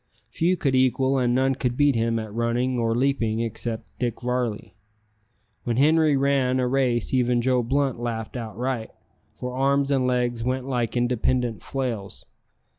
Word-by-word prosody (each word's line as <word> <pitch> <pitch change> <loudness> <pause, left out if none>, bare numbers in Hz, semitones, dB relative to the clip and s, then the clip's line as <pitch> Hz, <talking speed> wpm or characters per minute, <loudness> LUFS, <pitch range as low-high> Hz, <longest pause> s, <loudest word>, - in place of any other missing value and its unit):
Few 180 +3 +1
could 140 -4 0
equal 130 +1 +2
and 120 -1 +1
none 135 +1 +2
could 125 -2 -2
beat 145 -1 +4
him 115 0 0
at 110 -2 -5
running 120 +2 0
or 115 -1 +1
leaping 115 -4 +1
except 115 0 -5
Dick 120 -3 -2
Varley. 125 -3 -2 0.9
When 120 -1 -1
Henri 155 +1 +4
ran 135 -2 +2
a 125 - +1
race 125 -2 0
even 125 -1 +2
Joe 125 +1 +2
Blunt 135 +1 0
laughed 115 -1 -4
outright, 120 +1 -3 0.5
for 125 0 -5
arms 140 +1 +1
and 130 -2 +2
legs 120 -2 0
went 130 +1 -2
like 125 -3 -1
independent 120 -3 0
flails. 120 -7 -4
125 Hz, 155 wpm, -24 LUFS, 115-135 Hz, 0.9 s, beat